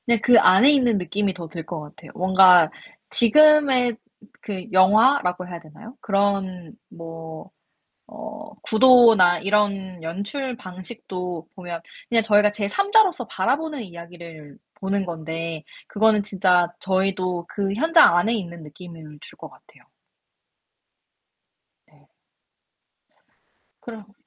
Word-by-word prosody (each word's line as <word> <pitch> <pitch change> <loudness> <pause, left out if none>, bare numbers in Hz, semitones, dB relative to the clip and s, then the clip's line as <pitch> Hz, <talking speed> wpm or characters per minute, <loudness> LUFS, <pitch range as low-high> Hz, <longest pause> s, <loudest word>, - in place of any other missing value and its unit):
그냥 235 -2 +2
그 245 -1 +5
안에 190 +10 +5
있는 250 -6 +1
느낌이 195 +2 -3
더 175 -2 -9
들 160 0 -9
것 170 -1 -7
같아요. 150 +1 -14
뭔가 185 -3 +5 0.4
지금의 260 -1 +3 0.4
그 190 -3 -7
영화라고 185 -1 +2
해야 175 -1 -9
되나요? 185 - -15
그런 195 -4 -2 0.2
뭐 165 0 -11 0.6
어 - - -11
구도나 225 -6 +5
이런 195 -3 -2
연출 205 - -6
방식도 180 -3 -9
보면 175 -3 -8 0.3
그냥 230 -1 +2
저희가 210 -1 +3
제삼자로서 370 - 0
바라보는 270 +10 -3
이야기를 170 -5 -13 0.2
보는 195 0 -2
건데 165 -1 -7 0.3
그거는 215 0 +1
진짜 180 -3 0
저희도 185 -2 -2
그 200 -1 -3
현장 320 - +4
안에 215 +6 +1
있는 170 -6 -7
느낌을 155 -1 -13
줄 - - -14
것 - - -12
같아요. - - -23 2.1
네. - - -29 1.7
그럼 215 -3 -12
190 Hz, 235 characters per minute, -21 LUFS, 175-225 Hz, 2.1 s, 그